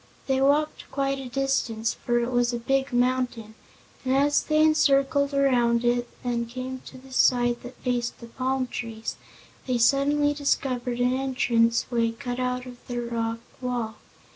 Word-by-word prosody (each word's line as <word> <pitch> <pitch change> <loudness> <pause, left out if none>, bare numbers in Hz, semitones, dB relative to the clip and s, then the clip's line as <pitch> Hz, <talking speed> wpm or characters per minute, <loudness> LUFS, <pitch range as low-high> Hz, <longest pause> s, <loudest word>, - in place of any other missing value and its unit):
They 265 -1 +1
walked 295 +3 +1
quite 275 0 -1
a 260 -2 -7
distance, 245 -4 0
for 240 0 -1
it 240 +1 -1
was 245 -1 +2
a 240 - -2
big 270 +3 0
mountain, 245 -3 0 0.5
and 260 0 +1
as 290 +1 +3
they 310 0 +3
circled 280 -1 +3
around 245 -4 +2
it 240 0 +1
and 235 -2 -1
came 255 +1 -5
to - - -10
the 260 0 -14
side 240 -2 +3
that 245 0 -10
faced 240 -1 -1
the 235 - -9
palm 255 +2 -1
trees, 225 -2 -5 0.5
they 250 -1 +1
suddenly 290 +4 +3
discovered 255 -4 -1
an 250 +1 +2
entrance 245 -3 +2
way 230 -1 +1
cut 245 +1 -5
out 250 0 -1
of 250 -1 -10
the 245 -1 -3
rock 230 -1 -2 0.2
wall. 245 -3 -3
250 Hz, 165 wpm, -26 LUFS, 240-270 Hz, 0.5 s, as